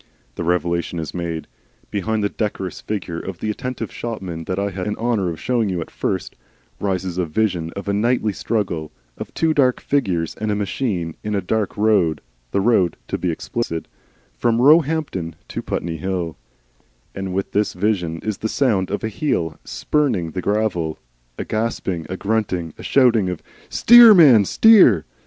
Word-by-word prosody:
The - - -5
revelation 85 0 -1
is 80 -1 -4
made. 85 -2 -4 0.5
Behind 105 +1 -1
the 100 - +1
decorous 100 -4 -4
figure 90 -6 -4
of 95 0 -6
the 110 +3 -2
attentive 125 +3 -5
shopman 95 -8 -5
that 95 - -3
I 100 0 -1
had 95 0 -4
the 105 - -1
honour 115 -6 0
of 80 - -6
showing 115 -4 0
you 90 -2 -2
at 80 - -6
first, - - -3 0.4
rises 95 -2 -2
a 90 - 0
vision 85 -1 -1
of 100 +1 -6
a 100 - 0
nightly 110 0 +1
struggle, 95 -9 -2 0.3
of - - -6
two 160 -1 +2
dark 130 -4 +3
figures 90 - -1
and 110 0 -4
a 105 - +1
machine 100 -5 -2
in 105 0 -2
a - - +2
dark 105 +2 -2
road, 100 -8 +2 0.3
the 100 - 0
road, 95 -6 +2
to - - -2
be 90 - -1
explicit, 85 0 -3 0.5
from 115 - +1
Roehampton 145 - +3
to - - -4
Putney 85 -1 -3
Hill, 90 -3 -3 0.8
and 95 -1 -5
with 95 +1 -2
this 105 0 0
vision 90 -4 -1
is 110 -3 -3
the 110 - -2
sound 105 -10 +1
of 100 - -3
a - - 0
heel 100 - -2
spurning 125 - -1
the 90 - -4
gravel, 95 -6 -1 0.4
a - - -4
gasping 100 -7 -2
and 95 - -4
grunting, 95 -6 -1
a - - -12
shouting 120 -8 +3
of 90 -3 -5 0.3
"Steer, 235 -2 +8
man, 130 - +7
steer!" 180 - +6
100 Hz, 175 wpm, -21 LUFS, 85-110 Hz, 0.8 s, Steer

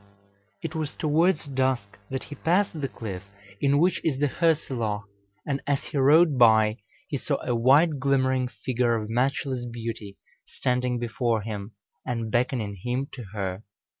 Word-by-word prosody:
It 160 -2 -4
was 155 -3 -3
towards 160 +2 +2
dusk 130 -8 -1
that 135 0 -3
he - - -9
passed 170 +1 +1
the 135 - 0
cliff 100 -8 -6 0.4
in 140 0 +3
which 175 +5 +2
is 140 -5 0
the 145 0 +2
Hörselloch, 130 -11 0 0.4
and 140 -1 -1
as 140 -1 +1
he - - -5
rode 145 +1 +5
by, 110 -2 +5 0.3
he - - -3
saw - - -1
a 125 - 0
white 140 +6 +4
glimmering 130 -1 +2
figure 120 +1 0
of 110 -1 -3
matchless 130 +1 0
beauty 115 -4 -6 0.3
standing 125 0 -1
before 115 -1 -1
him, 105 0 -6 0.3
and 115 -3 -3
beckoning 120 -5 0
him 125 +3 -2
to 125 -4 -7
her. 95 -2 -3
125 Hz, 155 wpm, -26 LUFS, 115-140 Hz, 0.4 s, rode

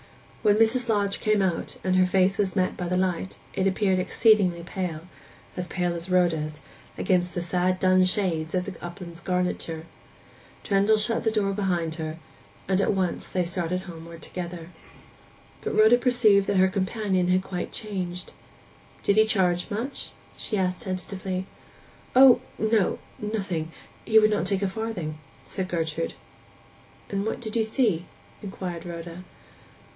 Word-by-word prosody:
When 210 -2 +4
Mrs. 230 +2 +2
Lodge 200 -2 +1
came 215 -2 +2
out, 175 -3 -2
and 185 0 +1
her 185 0 +5
face 190 +2 +2
was 195 -2 +1
met 185 -2 +1
by 180 - -4
the 180 +1 0
light, 185 0 -1 0.2
it 190 - +1
appeared 190 -1 +2
exceedingly 185 -3 +3
pale—as 180 0 -7
pale 175 0 -1
as 170 +2 -5
Rhoda's—against 175 +1 -1
the 175 - -1
sad 180 +2 0
dun 185 0 +4
shades 180 -4 0
of 180 0 0
the 200 - -5
upland's 175 -1 -8
garniture. 180 -3 -2 0.8
Trendle 200 +1 +3
shut 230 +2 +1
the 225 - +3
door 205 -3 0
behind 175 -5 -1
her, 160 -1 -5 0.5
and 190 0 +2
they - - +3
at - - +2
once 185 -2 -2 0.2
started 180 0 -1
homeward 165 -2 -10
together. 175 -1 -6 0.9
But - - -3
Rhoda 220 +3 +7
perceived 225 -6 +4
that 200 - +1
her 190 0 +6
companion 190 -1 0
had 185 +1 +2
quite 180 -2 -4
changed. 185 -4 -4 0.7
'Did 200 - +2
he 220 - +7
charge 180 -4 +1
much?' 240 +7 -3 0.3
she 215 - -2
asked 185 +1 0
tentatively. 190 -2 -4 0.7
'O 260 -1 +8 0.2
no—nothing. 205 -4 -1 0.4
He 220 - +5
would 215 0 +6
not 205 -3 +1
take 195 0 0
a - - +2
farthing,' 190 -7 -4 0.3
said 190 -1 -3
Gertrude. 165 -2 -2 1.0
'And 200 0 -1
what - - -2
did 220 -2 -5
you 225 - +3
see?' 220 -6 +1 0.3
inquired 185 -3 -6
Rhoda. 170 +1 -7
185 Hz, 150 wpm, -26 LUFS, 175-205 Hz, 1.0 s, O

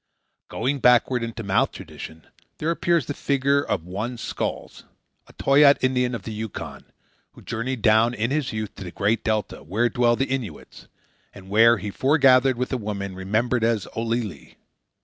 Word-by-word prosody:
Going 135 +4 -2
backward 125 0 +4
into 115 0 -5
mouth 95 -1 +1
tradition, 80 0 -10 0.3
there 160 +2 -1
appears 170 -3 +1
the 145 - -4
figure 140 0 +1
of 80 - -2
one 105 +7 -4
Skolkz, - - -5 0.5
a - - -18
Toyaat 140 +1 +5
Indian 125 -1 +1
of 105 - -7
the 110 - -6
Yukon, 110 -1 -7 0.5
who - - -16
journeyed 115 0 -4
down 110 +2 +4
in 115 +3 -1
his 140 -3 -1
youth 110 -2 -4
to - - -7
the 90 - -7
Great 105 +6 0
Delta 110 -2 -2
where 105 - 0
dwell 120 +1 +2
the 135 - 0
Innuits, 130 - -6 0.5
and 95 -1 -13
where 115 +3 +6
he 105 - -5
foregathered 130 -1 +4
with 125 +2 -2
a - - +1
woman 100 -3 -5
remembered 110 +6 -1
as 115 -4 0
Olillie. 115 - -3
115 Hz, 170 wpm, -23 LUFS, 105-130 Hz, 0.5 s, where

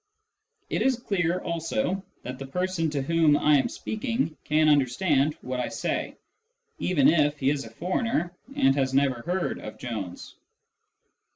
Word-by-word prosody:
It - - 0
is 255 +1 +3
clear 180 -6 0
also 170 - -2 0.2
that 130 +1 -6
the 135 - -6
person 180 +2 -1
to 145 -2 -2
whom 160 -1 +4
I 150 -1 +4
am - - 0
speaking 230 - -2
can 155 +1 +3
understand 145 +1 +2
what 130 0 -4
I 125 - -1
say, - - -3 0.6
even 150 -7 +3
if 150 -2 +3
he 135 0 +2
is 140 -2 -2
a - - -9
foreigner 180 -2 -1 0.2
and 135 0 +4
has 135 -1 0
never 135 -3 +2
heard 180 +7 -2
of 105 - -8
Jones. 105 -8 -6
150 Hz, 155 wpm, -26 LUFS, 135-180 Hz, 0.6 s, whom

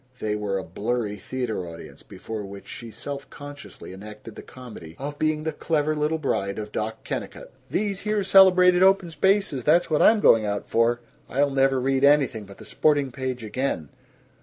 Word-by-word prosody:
They 105 -2 -2
were 105 -2 -2
a 95 - -4
blurry 105 +4 -3
theater 110 -5 -4
audience 85 0 -11
before 110 -1 -7
which 100 0 -10
she 115 - -8
self 140 +5 -7
consciously 145 -8 -10
enacted 105 +3 -11
the - - -8
comedy 110 -11 -11
of 145 +2 -6
being 155 0 0
the 160 - -1
Clever 155 0 0
Little 150 +2 0
Bride 100 -10 -2
of 105 -1 -6
Doc 110 +1 -4
Kennicott: - - -6 0.2
"These 200 -1 -1
here 210 -1 -1
celebrated 185 -2 +6
Open 190 -2 +4
Spaces, 190 - +1
that's 165 +4 +3
what 150 - +2
I'm 220 0 +6
going 115 - +5
out 105 -1 -3
for. 120 +1 +1 0.3
I'll 140 +2 +1
never 135 -1 +2
read 135 +1 0
anything 140 -7 +3
but 100 - -14
the - - -12
sporting 145 -3 +1
page 130 -2 -4
again. 110 - -3
130 Hz, 180 wpm, -24 LUFS, 105-155 Hz, 0.3 s, celebrated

